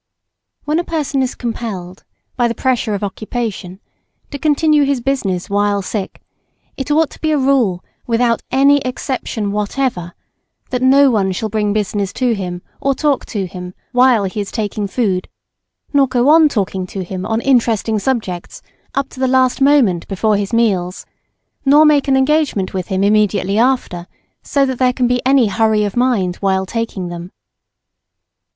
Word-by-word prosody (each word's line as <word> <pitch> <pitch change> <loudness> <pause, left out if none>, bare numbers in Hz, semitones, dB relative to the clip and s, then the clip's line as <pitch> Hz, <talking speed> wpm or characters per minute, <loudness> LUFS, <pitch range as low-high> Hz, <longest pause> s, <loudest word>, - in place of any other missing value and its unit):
When 305 +3 +1
a - - -1
person 300 -5 -2
is 255 -1 -2
compelled, 210 -6 -6 0.3
by 240 -2 +2
the 230 - -3
pressure 245 -5 0
of 200 - -5
occupation, 205 -2 -4 0.5
to 285 - -6
continue 305 +1 +3
his 280 -2 0
business 225 -9 -2
while 205 0 0
sick, 195 0 -5 0.5
it 270 +1 -5
ought 310 +1 +2
to - - -15
be 315 - 0
a 305 - +2
rule 260 -10 +1 0.2
WITHOUT 235 0 +1
ANY 280 +2 +4
EXCEPTION 250 -5 -3
WHATEVER, 210 -3 -2 0.6
that 250 -1 -1
no 270 +1 +5
one 195 -4 +1
shall 215 +4 -3
bring 210 -1 0
business 205 -1 -1
to 250 -2 +1
him 180 -4 -5 0.2
or 275 -1 +1
talk 290 -2 0
to 205 -4 -3
him 180 0 -8 0.2
while 250 -3 +4
he 195 +2 -3
is 200 - -6
taking 210 -2 -3
food, 195 -4 -1 0.7
nor 280 -1 +4
go 255 +1 +2
on 315 0 +6
talking 190 -6 -2
to 190 +1 -5
him 185 +1 -6
on 220 +2 -1
interesting 230 -4 +1
subjects 205 -8 -3 0.3
up 275 -1 0
to - - -13
the 260 - +1
last 255 0 +2
moment 265 - +3
before 210 +2 0
his 200 -1 -2
meals, 200 -6 0 0.6
nor 290 +2 +6
make 295 -2 +3
an 270 -1 +3
engagement 265 -8 +1
with 185 -2 -3
him 190 0 -1
immediately 205 -1 +2
after, 235 -9 0 0.3
so 280 -1 +1
that 260 -2 -3
there 255 -1 +3
be 250 -1 +1
any 270 -2 +4
hurry 215 +1 +1
of 205 -2 -3
mind 235 -8 +1
while 190 -1 0
taking 205 -4 -4
them. 175 +1 -8
230 Hz, 165 wpm, -17 LUFS, 195-265 Hz, 0.7 s, on